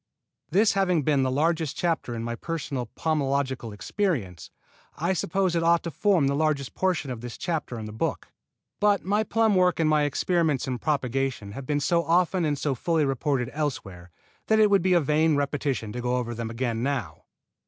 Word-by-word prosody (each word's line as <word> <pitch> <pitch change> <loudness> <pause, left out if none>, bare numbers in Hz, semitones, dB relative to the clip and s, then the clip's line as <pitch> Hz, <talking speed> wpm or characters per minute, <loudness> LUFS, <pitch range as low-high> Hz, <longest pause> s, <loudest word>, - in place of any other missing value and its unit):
This 205 +5 +4
having 180 -5 +2
been 145 -1 +2
the 130 - +1
largest 160 +2 0
chapter 165 -8 -1
in 115 - -4
my 120 0 -3
personal 140 -3 -4
pomological 140 -6 -1
experience, 105 - -2 0.5
I 170 +4 0
suppose 185 0 0
it 165 - +2
ought 170 0 +3
to 170 - -4
form 185 0 +2
the 140 - +1
largest 145 -2 0
portion 180 -8 -1
of 120 -3 -6
this 120 -1 -7
chapter 155 -8 -3
in 110 - -6
the 105 - -7
book; 110 - -3 0.5
but 205 -1 +2
my 205 +3 +2
plum 225 -1 +2
work 180 -2 +3
and 160 - +3
my 155 -1 +3
experiments 150 -1 +1
in 125 -2 -2
propagation 135 -6 -1
have 130 +4 -8
been 145 -1 +1
so 170 +4 +1
often 175 +1 +2
and 145 -2 0
so 140 0 -1
fully 160 +3 +1
reported 135 -1 -1
elsewhere 100 - -4 0.4
that 220 - +4
it 210 -1 +5
would 200 - +5
be 185 +1 +2
a 175 - +5
vain 155 +1 +2
repetition 140 -5 -1
to 125 - -4
go 125 +1 0
over 120 -1 -3
them 115 0 -4
again 115 -1 -2
now. 125 - -3
145 Hz, 195 wpm, -26 LUFS, 125-170 Hz, 0.5 s, it